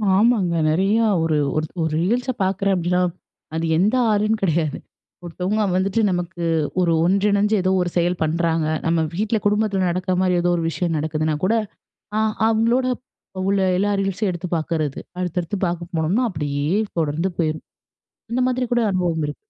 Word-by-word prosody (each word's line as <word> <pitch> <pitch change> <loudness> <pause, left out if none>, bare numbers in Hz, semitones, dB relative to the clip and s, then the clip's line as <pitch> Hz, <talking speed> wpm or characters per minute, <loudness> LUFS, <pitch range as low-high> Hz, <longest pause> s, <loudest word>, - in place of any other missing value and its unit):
ஆமாங்க 195 -5 +3
நெறையா 195 +8 +2 0.2
ஒரு, 155 -2 +1 0.2
ஒரு, 155 0 0 0.2
ஒரு 160 - -1
ரீல்ஸ் 240 +8 0
பாக்குறேன் 195 +1 +1
அப்டீன்னா, 180 0 +1 0.5
அது 165 +1 -1
எந்த 210 +8 +2 0.2
ஆளும் 215 +1 +1
கிடையாது. 160 -5 0 0.5
ஒருத்தவங்க 185 +5 -1
வந்துட்டு 195 +4 +1
நமக்கு 175 0 -3 0.4
ஒரு 170 - +2
ஒன்றிணைஞ்சு 200 +3 +2
ஏதோ 185 +1 +1
ஒரு 175 - -1
செயல் 175 +1 +1
பண்ணுறாங்க, 165 0 0 0.2
நம்ப 165 0 +2
வீட்ல 215 +3 0
குடும்பத்துல 205 -2 +1
நடக்குற 185 +1 -1
மாதிரி, 180 -1 +2
ஏதோ 175 0 +2
ஒரு 165 - -1
விஷயம் 170 -1 -2
நடக்குதுனா 155 0 -1
கூட, 215 - +2 0.6
அ - - +2 0.3
அவங்களோட 230 +3 +2 0.6
உள்ள 200 0 +2 0.2
எல்லா 205 +2 +1
ரீல்ஸையும் 195 +1 -1
எடுத்து 175 +1 -5
பாக்குறது. 155 -3 -2 0.2
அடுத்தடுத்து 180 +2 -2
பாக்க 170 0 -4
போனோம்னா, 170 +10 +1
அப்டீயே 145 -1 -2 0.3
தொடர்ந்து 160 +4 -1
போயிரும் 155 -2 -1 0.7
அந்த 250 - +1
மாதிரி 255 0 0
கூட 240 - +3
அனுபவம் 175 -4 0
இருக்கு. 145 - -5
180 Hz, 150 wpm, -21 LUFS, 165-205 Hz, 0.7 s, ஆமாங்க